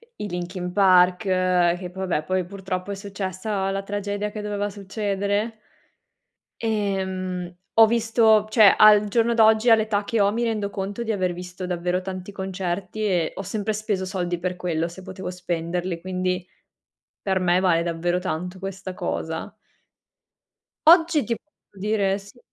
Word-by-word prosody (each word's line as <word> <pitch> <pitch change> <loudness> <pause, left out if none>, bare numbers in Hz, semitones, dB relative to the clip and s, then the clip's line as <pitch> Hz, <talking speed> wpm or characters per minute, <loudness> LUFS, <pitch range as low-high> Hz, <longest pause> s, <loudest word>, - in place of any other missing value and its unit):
E - - -7
i - - -3
Linkin 180 +1 -4
Park, 180 0 +5
che 180 -2 +1
poi 190 0 -4
vabbè, 155 -3 0
poi 185 -1 -1
purtroppo 190 0 -5
è - - -3
successa 195 0 -3
la 195 0 -2
tragedia 205 +1 -3
che 210 - -6
doveva 205 0 -2
succedere. 205 +2 -2 1.1
Ehm, 190 -4 -2 0.2
ho 225 - +9
visto 225 -1 +3
cioè, 215 -3 +6
al 210 -1 +7
giorno 230 +2 +2
d'oggi, 220 +1 +5
all'età 220 -2 +3
che 225 +2 -1
ho, 200 -1 +4
mi 235 +2 -1
rendo 215 -3 -1
conto 200 +3 -4
di 225 -1 -1
aver 185 -3 0
visto 180 +1 -7
davvero 180 0 -1
tanti 185 +1 -7
concerti 190 +1 -4
e 175 -5 +1
ho - - -5
sempre 205 +2 -2
speso 210 -2 -2
soldi 180 -2 -2
per 180 +1 -3
quello, 170 -2 -1
se 175 +3 -11
potevo 190 0 -7
spenderli; 175 0 -3
quindi 185 0 -2 0.7
per 190 -1 0
me 180 0 +3
vale 175 -3 +3
davvero 170 +1 -1
tanto 180 +1 -4
questa 195 0 -6
cosa. - - -4 1.4
Oggi 330 -2 +6
ti 230 - -1 0.4
dire: 200 -1 +1
sì. 200 +5 -15
190 Hz, 150 wpm, -24 LUFS, 180-210 Hz, 1.4 s, ho